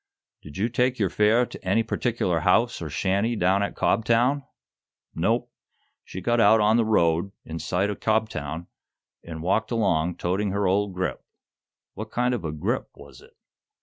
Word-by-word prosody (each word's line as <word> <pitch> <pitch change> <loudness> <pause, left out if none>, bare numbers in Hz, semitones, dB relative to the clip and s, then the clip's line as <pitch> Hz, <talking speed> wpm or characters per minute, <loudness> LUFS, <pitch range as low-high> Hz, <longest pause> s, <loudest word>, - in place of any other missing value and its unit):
"Did 75 +2 -11
you 105 +4 +1
take 125 +2 0
your 100 -5 0
fare 105 +6 +3
to - - -12
any 100 +5 +2
particular 110 -7 -1
house 105 +8 +2
or 80 - -5
shanty 100 +9 0
down 95 0 +2
at 100 - -2
Cobtown?" 120 +6 +2 0.7
"Nope; - - 0 0.5
she 95 - -8
got 120 +5 +1
out 110 0 +6
on 105 +2 +4
the 115 - +2
road, 85 -3 +2
in 80 +1 -6
sight 90 +6 -1
o' - - -4
Cobtown, 90 -9 -2 0.6
an' 80 -1 -8
walked 95 +6 0
along, 90 -7 +1
toting 95 +4 -1
her 100 0 0
old 100 0 0
grip." 90 0 -3 0.7
"What 110 +1 -7
kind 125 +2 0
of 115 -7 -3
a 80 - -3
'grip' 75 0 -2
was - - -14
it?" - - -19
100 Hz, 170 wpm, -25 LUFS, 90-115 Hz, 0.7 s, out